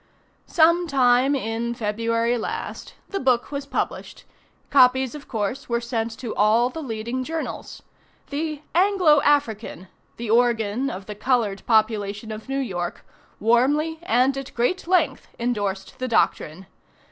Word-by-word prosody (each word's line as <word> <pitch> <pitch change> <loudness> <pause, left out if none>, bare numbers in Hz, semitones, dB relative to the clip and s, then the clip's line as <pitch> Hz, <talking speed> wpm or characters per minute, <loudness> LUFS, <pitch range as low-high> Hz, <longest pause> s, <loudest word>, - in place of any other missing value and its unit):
Some 340 +2 +4
time 260 -1 +3
in 235 -1 -2
February 230 +2 0
last, 230 - -5
the 395 - -2
book 255 -1 +1
was 280 -1 -4
published. - - -4 0.5
Copies, 260 -1 +4
of 295 -1 -10
course, 220 +2 -3
were 235 0 +1
sent 230 -2 -3
to 245 -4 -5
all 225 +4 +3
the 320 - -6
leading 235 0 -4
journals. 320 +3 -5 0.5
The 305 0 -3
"Anglo 360 -5 +4
African," 225 - 0 0.3
the 230 -2 -3
organ 235 +1 +2
of 190 -5 -7
the 210 - -6
colored 210 -3 0
population 215 -1 +1
of 215 +4 -8
New 270 - -1
York, 180 -10 -4 0.3
warmly, 290 +8 +2
and 260 -3 +2
at 275 - -9
great 290 +10 0
length, 325 -7 +1
indorsed 205 -5 -3
the 255 - -2
doctrine. 190 -6 0
245 Hz, 135 wpm, -23 LUFS, 220-280 Hz, 0.5 s, Some